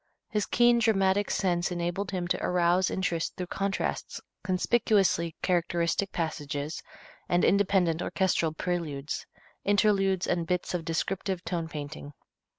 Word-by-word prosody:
His 210 -2 0
keen 240 0 +4
dramatic 205 -3 +2
sense 175 -1 0
enabled 175 +3 -2
him 180 -2 -2
to - - 0
arouse 180 +1 +2
interest 170 -3 -1
through 180 - -4
contrasts, 195 0 -2 0.2
conspicuously 190 -4 +2
characteristic 175 +1 +1
passages, 150 -2 -3 0.5
and 175 0 +3
independent 185 -4 +3
orchestral 170 -2 +1
preludes, 160 -4 -3 0.4
interludes 195 -2 +3
and 170 -2 -1
bits 180 +1 -1
of 170 -2 -2
descriptive 185 +2 -2
tone 170 -3 -2
painting. 145 -1 -7
180 Hz, 120 wpm, -28 LUFS, 165-195 Hz, 0.5 s, keen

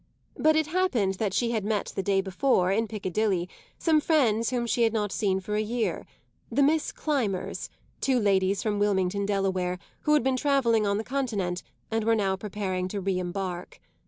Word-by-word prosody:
But 315 0 +3
it 315 0 +3
happened 300 - +1
that 210 -3 0
she 235 +4 0
had 220 -3 -1
met 210 -1 -1
the - - 0
day 195 0 +2
before, 190 0 +1
in 220 +3 +1
Piccadilly, 200 -3 -1 0.3
some 315 -2 +3
friends 230 -9 +2
whom 245 -1 -1
she 235 +1 0
had 225 -1 +3
not 210 -2 -1
seen 190 -2 0
for 190 +2 -5
a 210 - +2
year: 230 +2 -2 0.4
the 280 +5 +3
Miss 310 +2 +2
Climbers, 240 -12 -2 0.3
two 265 -2 +2
ladies 195 -2 +2
from 210 -2 0
Wilmington, 200 -1 +1
Delaware, 190 -3 0 0.2
who 300 - +1
had 295 - +3
been 260 0 +1
travelling 245 -6 +2
on 200 0 +1
the 220 - -2
Continent 215 -9 -2 0.3
and 225 0 0
were 225 +1 +3
now 195 -3 +1
preparing 190 -2 -3
to 200 +2 -4
re 190 -1 -1
embark. 180 0 -4
210 Hz, 190 wpm, -27 LUFS, 190-240 Hz, 0.4 s, But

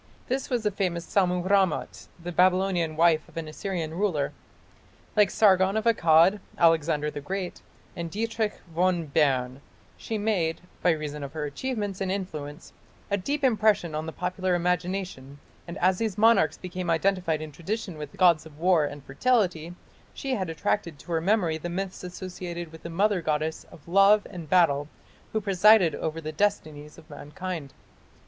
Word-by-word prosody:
This 265 +2 -2
was 245 -3 0
the 210 - +1
famous 175 -3 -2
Sammu 180 -2 +1
rammat, 155 - +1
the 175 +1 -6
Babylonian 180 -2 +2
wife 160 -1 +3
of - - -15
an 165 -1 -4
Assyrian 165 0 -4
ruler. 170 -6 -1 0.8
Like 210 -2 +5
Sargon 195 -1 +4
of 220 - -2
Akkad, 175 -3 +5 0.2
Alexander 160 -3 +2
the 145 - -6
Great, 185 +4 -5 0.3
and 170 -1 -4
Dietrich 220 +3 -2 0.2
von 175 0 +1
Bern, 135 -3 +1 0.4
she 225 - -4
made, 195 -7 0 0.2
by 180 - +3
reason 150 -3 -2
of 140 - -7
her 155 -2 -3
achievements 205 - -4
and 190 -1 -1
influence, 160 -6 -6 0.4
a - - +4
deep 280 +9 -3
impression 215 - +2
on 155 +1 -3
the - - -4
popular 180 +1 -1
imagination, 180 -5 -2 0.3
and 170 +2 -6
as 185 0 +2
these 220 -4 -2
monarchs 220 -7 +4
became 180 -1 -5
identified 165 -1 +1
in 155 -1 -7
tradition 185 +4 -4
with 150 -2 -9
gods 170 -4 +4
of 150 -2 -17
war 170 -2 +3
and 145 -1 -7
fertility, 175 - 0 0.4
she 270 -1 -3
had 190 -8 -2
attached 170 -1 -2
to 170 - -11
her 165 -1 +1
memory 175 -4 +1
the 175 - -5
myths 185 +2 -4
associated 180 -2 -6
with 160 - -12
the 170 - -7
mother 195 +2 +1
goddess 155 0 -2
of 155 - -16
love 195 +4 +5
and 170 -5 -8
battle 145 -6 +3 0.4
who 220 - 0
presided 200 -3 +5
over 160 +2 -3
the 155 -1 -5
destinies 155 -5 -2
of 155 - -15
mankind. 160 0 -7
175 Hz, 165 wpm, -26 LUFS, 155-195 Hz, 0.8 s, Like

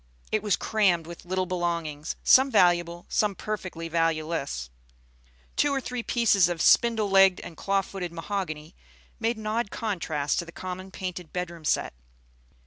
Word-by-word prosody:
It 215 - +1
was 205 -4 +2
crammed 190 -7 +1
with 170 +1 -10
little 185 +1 -1
belongings, 170 -4 -2
some 265 +1 +6
valuable, 175 -5 +3
some 210 -2 +1
perfectly 185 -6 -5
valueless. 160 - -1 0.8
Two 290 - +2
or 275 - +1
three 250 -1 -4
pieces 215 -7 +3
of 175 -1 -3
spindle 225 +3 +4
legged 195 -1 +5
and 165 - -9
claw 195 +3 0
footed 185 -3 -6
mahogany 165 -2 -4 0.4
made 230 0 0
an 215 - -8
odd 215 0 -1
contrast 160 -11 -2
to 170 - -3
the 170 - -11
common 185 +2 -6
painted 180 -3 -6
bedroom 175 -3 -5
set. - - +1
180 Hz, 150 wpm, -27 LUFS, 165-210 Hz, 0.8 s, some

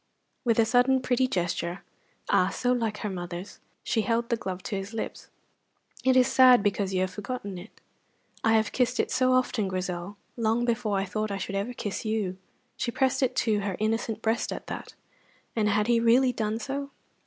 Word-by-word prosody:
With 230 -3 +2
a 230 - +5
sudden 250 +3 +4
pretty 255 0 +1
gesture 175 -2 -2 0.4
ah, 180 - +3
so 245 +5 0
like 225 -4 0
her - - 0
mother's! 175 +1 -6 0.2
she 225 - +1
held 235 +1 0
the 235 - +2
glove 190 -4 -5
to 210 - -3
his 195 +3 -5
lips. 225 - -5 0.7
"It 260 0 +4
is 255 - +6
sad 255 -4 +6
because 200 -1 0
you 185 -1 +1
have 185 0 0
forgotten 205 -1 -5
it." 190 +5 -11 0.7
"I 225 - +4
have 220 -1 +2
kissed 250 -1 0
it - - +1
so 255 0 +3
often, 255 -5 +1
Grizel, 185 +1 -4 0.2
long 230 +1 +1
before 230 -4 0
I 195 - 0
thought 215 +2 -2
I 200 - -2
should 195 - -5
ever 200 +5 -2
kiss 205 -3 -4
you!" 210 -4 -2 0.4
She - - -1
pressed 265 +2 +1
it 255 -1 +1
to 215 -3 +2
her 200 -2 -2
innocent 225 0 -1
breast 225 +1 0
at - - -5
that. - - -7 0.6
And 215 -2 +2
had 210 +1 +2
he 235 0 +3
really 245 +3 +4
done 215 -1 -1
so? 275 +3 -4
220 Hz, 195 wpm, -27 LUFS, 195-245 Hz, 0.7 s, is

